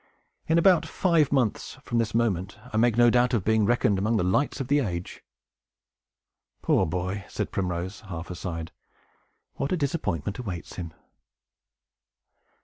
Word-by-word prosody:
In 160 - +3
about 175 -1 +5
five 165 -6 +2
months 130 -7 0
from 120 - -1
this 110 -2 -1
moment, 105 -4 0 0.2
I - - 0
make 115 0 +3
no 120 -1 +6
doubt 125 +1 +3
of 105 - 0
being 110 -1 +3
reckoned 105 -4 +2
among 110 +3 +1
the 105 - +1
lights 135 +12 +1
of 135 - -3
the 145 +2 +3
age!" 90 -9 -4 1.4
"Poor - - +3
boy!" 90 +4 -3
said - - -3
Primrose, 90 +1 -3
half 85 -1 -6
aside. 85 -2 -5 0.9
"What 140 - -2
a 185 - +2
disappointment 125 - -2
awaits 95 -8 -6
him!" 85 -3 -5
110 Hz, 145 wpm, -26 LUFS, 90-125 Hz, 1.4 s, no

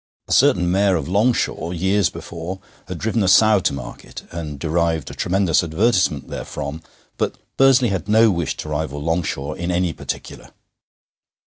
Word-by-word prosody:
A - - -9
certain 90 -1 +4
Mayor 95 0 +3
of 80 - -2
Longshaw, 100 -4 +1
years 95 +2 +1
before, 85 +3 -7 0.3
had 90 -2 -5
driven 110 +4 -1
a 95 - +1
sow 105 +3 +6
to - - 0
market, 70 -3 -8
and 80 -4 -6
derived 80 +1 -1
a - - -8
tremendous 95 -2 +1
advertisement 90 - +1
therefrom, 70 +3 -6 0.4
but - - -1 0.2
Bursley 135 -2 +5
had 95 +1 -3
no 110 +1 +5
wish 85 -3 -2
to 75 - -6
rival 75 -1 -3
Longshaw 80 -3 -2
in 85 +2 -4
any 90 -1 0
particular. - - -7
90 Hz, 155 wpm, -21 LUFS, 80-100 Hz, 0.4 s, sow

